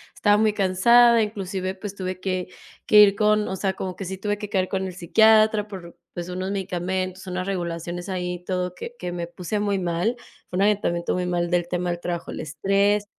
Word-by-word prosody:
estaba 205 0 +3
muy 215 -1 +3
cansada, 230 +5 +5
inclusive, 195 -3 -3
pues 195 +1 -7
tuve 185 -1 -4
que 185 -1 -2 0.4
que 210 - +7
ir 200 -1 +6
con, 210 0 +2
o 190 - -3
sea, 190 0 -1
como 185 -1 -5
que - - -6
sí 190 +1 -5
tuve 205 +1 -2
que 210 -1 -6
caer 185 -2 0
con 190 -1 -2
el 185 - -5
psiquiatra 215 +3 +4
por, 180 -4 -9 0.2
pues 175 0 -5
unos 185 +2 -3
medicamentos, 185 0 -3
unas 185 +1 -3
regulaciones 175 -1 -4
ahí, 180 -1 -3
todo 180 -1 -2
que 240 - -8
que 180 -1 -4
me 175 -1 -4
puse 180 +4 -4
muy 205 -2 0
mal. 175 +6 0 0.3
Fue 180 - -4
un 195 - +2
agotamiento 195 -5 +1
muy 180 0 -1
mal 175 -1 -1
del 175 -1 +1
tema 180 0 -2
del 175 0 -2
trabajo, 175 -1 -4
el - - -6
estrés 200 +6 +1
185 Hz, 210 wpm, -24 LUFS, 180-205 Hz, 0.4 s, que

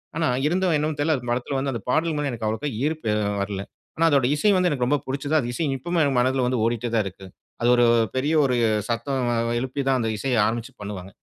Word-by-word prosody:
ஆனா, 165 -1 +1 0.2
இருந்தும் 180 0 +1
என்னவோ 150 +1 -1
தெரியல. 155 +1 +2
அந்த 125 -1 -9
படத்தில 125 +3 -1
வந்து 135 0 -1
அந்த 115 - -4
பாடல் 160 +4 +1
மேல 145 -1 -1
எனக்கு 115 -2 -5
அவ்ளோகா 115 +7 -2 0.2
ஈர்ப்பு 155 -8 -1 0.3
வரல. 100 -1 -3 0.4
ஆனா 165 - +3
அதோட 140 -4 +3
இசை 210 +8 +3
வந்து 180 -1 +3
எனக்கு 130 -6 0
ரொம்ப 145 +3 +2
பிடிச்சது. 140 +3 -2
அந்த 120 -3 -3
இசை 160 - -1
இப்பவுமே 170 +5 -1
என் 135 -3 0
மனதில 130 +1 +2
வந்து 125 -2 0
ஓடிட்டே 120 +1 0
தான் 110 - +3
இருக்கு. 95 0 -8 0.4
அது 120 - +2
ஒரு 120 0 +4 0.3
பெரிய 140 +4 0
ஒரு 125 -2 +1 0.3
சத்தம் 120 +2 -1 0.3
எழுப்பி 130 +2 -3
தான் 135 -1 +3
அந்த 115 -1 -1
இசைய 125 +4 -1
ஆரம்பிச்சு 120 +4 -3
பண்ணுவாங்க. 100 -2 -7
130 Hz, 220 wpm, -24 LUFS, 120-150 Hz, 0.4 s, ஒரு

